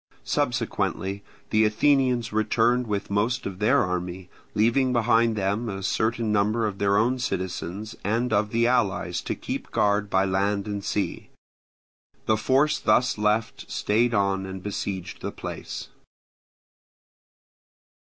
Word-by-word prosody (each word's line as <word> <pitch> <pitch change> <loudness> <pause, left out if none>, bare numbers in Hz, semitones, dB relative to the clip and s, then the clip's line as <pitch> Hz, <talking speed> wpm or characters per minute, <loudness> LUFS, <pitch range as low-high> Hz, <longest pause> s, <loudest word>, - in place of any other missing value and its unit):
Subsequently 100 - -1 0.3
the 110 0 +4
Athenians 125 +1 +2
returned 115 +3 +2
with 100 -1 -3
most 110 +5 0
of 95 -2 -5
their 125 +7 +4
army, 90 -1 -4 0.2
leaving 120 +5 +3
behind 115 -1 +3
them 105 +3 -1
a 95 -1 -5
certain 110 +2 0
number 105 +2 +2
of 100 -2 -3
their 100 0 +3
own 125 +4 +2
citizens 95 -1 -4
and 115 +3 0
of 105 0 +2
the 115 +2 +2
allies 100 -7 +1
to - - -3
keep - - -5
guard 105 0 +1
by 95 0 +2
land 100 +1 0
and 100 -1 -4
sea. 105 - -2 1.0
The 110 - +3
force 135 +7 +2
thus 115 +1 +2
left 105 +1 0
stayed 115 +3 +1
on 100 -1 +1
and 95 -1 -7
besieged 95 -3 -4
the - - -3
place. - - -7
105 Hz, 130 wpm, -25 LUFS, 100-115 Hz, 1.0 s, the